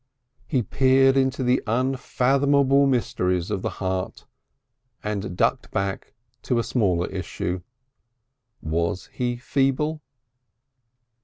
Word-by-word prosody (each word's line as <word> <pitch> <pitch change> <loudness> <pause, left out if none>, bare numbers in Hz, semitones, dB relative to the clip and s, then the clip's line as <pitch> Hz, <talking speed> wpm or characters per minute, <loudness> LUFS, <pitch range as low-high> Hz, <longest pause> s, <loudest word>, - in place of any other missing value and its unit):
He 125 -3 +1
peered 135 +4 +4
into 130 0 +1
the 125 +1 +2
unfathomable 135 +3 +2
mysteries 90 -8 0
of 100 -3 -1
the - - -1
heart, 95 -1 -3 0.8
and 105 -3 -3
ducked - - +1
back 100 0 -3 0.3
to 125 - 0
a 115 - +1
smaller 90 -9 +1
issue. 90 -1 -4 1.0
Was 85 +3 -2
he 120 -1 -1
feeble? 140 +5 0
125 Hz, 100 wpm, -24 LUFS, 95-135 Hz, 1.0 s, peered